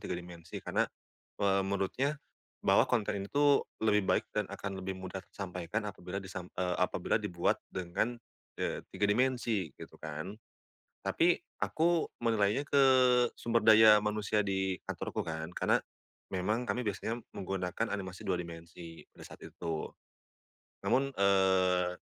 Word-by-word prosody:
3 - - -3
dimensi 85 -1 -9
karena, - - +1 0.5
eee, 100 -1 +2
menurutnya, 100 +9 0 0.5
bahwa - - +5
konten 105 -4 0
ini 100 - -6
tuh 145 0 +3 0.2
lebih 105 -2 +4
baik 110 - +3
dan 105 -2 -1
akan 100 -1 -5
lebih 95 0 -4
mudah 95 0 -6
tersampaikan 95 +2 -4
apabila 95 -2 -6
disam 90 -1 -7
eee, 90 -1 0
apabila 90 +3 +1
dibuat 90 -4 0
dengan, 95 +7 -2 0.4
eee, - - -2
3 100 - -2
dimensi 115 -4 +1
gitu - - -12
kan. 80 +4 -5 0.7
Tapi, 175 +1 +2 0.2
aku 170 +1 +1
menilainya 115 +3 +1
ke 135 -2 +5 0.4
sumber 115 0 +1
daya 110 -1 +8
manusia 105 0 0
di 95 -2 -1
kantorku - - -4
kan, 80 +1 -5
karena - - +3 0.6
memang 105 +7 0
kami 115 +4 -1
biasanya 110 +2 -3 0.2
menggunakan 95 +3 -2
animasi 95 -2 -5
2 95 - +1
dimensi 85 0 -10
pada - - -13
saat - - -12
itu. 80 -2 -5 0.9
Namun, 135 +2 +2
eee, 95 -2 +3
100 Hz, 135 wpm, -32 LUFS, 90-110 Hz, 0.9 s, daya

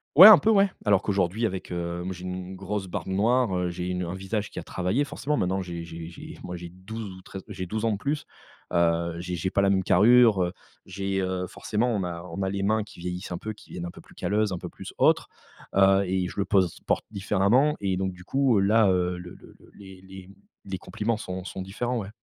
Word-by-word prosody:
Ouais, 185 +7 +13
un 220 - +11
peu, 220 - +1
ouais, 200 -2 +4
alors 100 -3 +3
qu'aujourd'hui 100 +3 0
avec, 95 -3 -4
heu, 85 0 -3
moi, 95 - -4
j'ai 90 0 -9
u - - -4
une 90 +1 -5
grosse 95 +1 -4
barbe 90 - -4
noire, 110 +2 +2
heu, 90 -1 0
j'ai 90 +1 -4
une 90 0 -2
un 85 +2 -4
visage 105 +2 -3
qui - - -16
a - - -3
travaillé, 95 +10 0
forcément. 145 +1 -2
Maintenant 95 +1 0
j'ai 85 -2 -6
j'ai 85 0 -8
j'ai 85 - -10
moi, 90 - -5
j'ai 85 0 -7
12 95 +6 -8
ou 95 - -12
13 95 0 -9
j'ai 95 -3 -6
12 110 +3 -2
ans 115 - +2
de 100 - -1
plus. 145 +6 -2 0.5
Heu, 85 -1 +2
j'ai 90 0 -4
j'ai 95 +3 -2
pas 100 - +2
la 100 - +3
même 95 -1 +2
carrure, 110 0 +6
heu, 90 - -2 0.3
j'ai, 95 +1 -2
heu, 95 -1 -2
forcément, 115 +5 -1
on 100 - -1
a 85 -1 -5
on 90 - -4
a 95 - 0
les 100 0 -2
mains 110 +1 +2
qui 105 - -15
vieillissent 90 +1 -5
un 85 - -2
peu, 110 +5 -5
qui - - -18
deviennent 85 -1 -5
un 85 - -5
peu - - -13
plus - - -20
calleuses, 105 0 0
un - - -2
peu - - -7
plus - - -10
autres, - - +3 0.5
heu, 95 0 +5
et 95 -1 0
je - - -7
le 100 - +1
pose 95 -4 +2
porte - - +1
différemment 105 +8 +2
et 95 -2 0
donc 95 0 -1
du 90 - -13
coup, 135 +2 +2
heu, 95 - +4
là, 110 +2 +4
heu, 90 -1 +1
le 90 0 -10
le - - -16
le - - -19
les 95 -2 -13
les 95 0 -12 0.4
les 95 -1 -4
compliments 110 +3 -2
sont 95 -3 -5
sont 95 - -6
différents, 120 +6 -2
ouais. 100 -3 -6
95 Hz, 255 wpm, -26 LUFS, 90-105 Hz, 0.5 s, Ouais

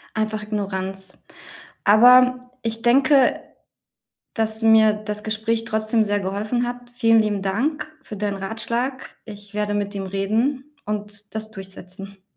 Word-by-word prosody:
Einfach 215 0 -1
Ignoranz. 195 -3 -4 0.7
Aber 250 +3 +6
ich 225 0 -1
denke, 265 +2 +4 0.9
dass 220 0 0
mir 220 -1 +6
das 210 0 -5
Gespräch 220 +1 -1
trotzdem 220 0 +1
sehr 205 0 0
geholfen 210 +6 -2
hat. 245 0 -7
Vielen 225 -2 +4
lieben 210 -2 -1
Dank 290 +11 -2
für 215 - -9
deinen 200 0 -2
Ratschlag. 235 +6 -3
Ich 205 -1 -10
werde 210 0 -1
mit 205 0 -2
ihm 195 -1 -4
reden 230 +9 -1
und 210 0 -6
das 220 0 -4
durchsetzen. 195 -1 -8
215 Hz, 130 wpm, -22 LUFS, 205-235 Hz, 0.9 s, Aber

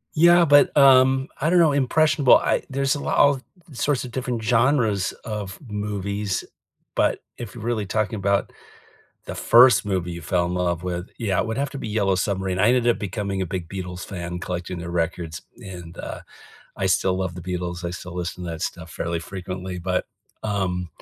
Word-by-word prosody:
Yeah, 170 +2 +6
but, 145 -1 +5
um, 135 -1 +6
I 155 - +2
don't 180 +1 +4
know, 165 -3 +5
impressionable 145 +1 +4
I - - 0
there's 135 0 0
a - - -4
lot - - -1
of 140 -2 +4 0.3
sorts 135 +1 0
of 125 - -8
different 125 -2 -3
genres 115 -4 +2
of 105 -4 -5
movies, 105 -2 -3 0.5
but - - +1
if 120 -2 -8
you're 115 - -8
really 115 -3 -1
talking 110 +3 -1
about 100 0 0 0.8
the - - -5
first 120 -5 +6
movie 90 -3 -1
you 85 - -6
fell 85 +3 +1
in 90 - -3
love 90 -2 -1
with, 90 0 -4
yeah, 100 -6 0
it - - -2
would 115 0 -3
have 140 0 -1
to 140 - -7
be 125 - -5
Yellow 100 -3 +1
Submarine, 95 -1 -1
I 105 +4 +4
ended 125 -1 +3
up 120 - +3
becoming 100 0 -3
a 95 - -1
big 85 -1 -5
Beatles 90 -2 -6
fan 90 -2 -5
collecting 90 0 -4
their 85 0 -6
records, 85 -1 -2 0.2
and, 90 -3 -9
uh, - - -6 0.6
I 95 - -1
still 95 0 +2
love 95 -2 -2
the 90 - -8
Beatles, 90 -1 -4
I 85 - -2
still 90 0 -8
listen 90 0 -4
to 85 - -4
that 80 -1 -6
stuff 85 -2 -5
fairly 85 +1 -3
frequently, 90 +1 -6
but, 90 +1 -1 0.4
um 95 -4 -1
100 Hz, 195 wpm, -23 LUFS, 90-120 Hz, 0.8 s, Yeah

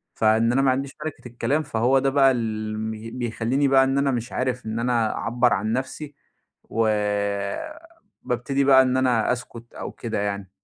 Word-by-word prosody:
فإن 110 +1 +3
أنا 135 +2 +2
ما 135 -1 +3
عنديش 135 +1 -2
مَلِكِة 155 -5 -6
الكلام، 140 +6 -1
فهو 130 -1 +2
ده 135 +1 +1
بقى 135 -1 +5
الم 110 -2 -3
بيخلّيني 115 +4 -2
بقى 135 0 +5
إن 135 +1 0
أنا 140 0 +2
مش 120 -1 -3
عارف 125 -1 -2
إن 110 +1 -3
أنا 115 -2 +1
أعبّر 120 0 +1
عن 110 +3 -1
نفسي 135 +3 -4 0.5
و 115 0 0 1.4
بابتدي 125 +3 -1
بقى 135 -1 +7
إن 130 0 +1
أنا 125 -4 +2
أسكُت 120 -1 -6
أو - - -6
كده 115 -3 -4
يعني. 100 -2 -3
125 Hz, 170 wpm, -24 LUFS, 115-135 Hz, 1.4 s, بقى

